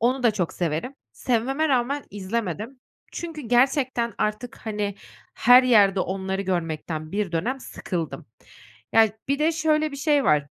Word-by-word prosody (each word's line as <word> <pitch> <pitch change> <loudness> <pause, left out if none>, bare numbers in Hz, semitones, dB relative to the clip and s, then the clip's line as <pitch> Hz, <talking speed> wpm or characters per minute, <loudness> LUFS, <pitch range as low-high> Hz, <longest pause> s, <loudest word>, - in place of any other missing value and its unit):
onu 255 +3 +1
da 235 - +5
çok 185 -5 -2
severim. 170 - -2 0.2
Sevmeme 265 +6 0
rağmen 270 +1 0
izlemedim 210 +4 -4 0.3
çünkü 330 -3 -6
gerçekten 250 0 +1
artık, 225 +4 -2
hani, 210 -3 -3 0.4
her 245 +2 +7
yerde 205 -6 +4
onları 190 +1 -2
görmekten 160 -3 -3
bir 200 -3 -2
dönem 240 +12 -1
sıkıldım. 170 - -5 0.7
Ya, 225 -1 +7 0.2
bir 280 0 +1
de 315 +2 +3
şöyle 310 -1 +1
bir - - -6
şey 290 -1 +2
var 150 -2 +3
230 Hz, 140 wpm, -24 LUFS, 190-270 Hz, 0.7 s, her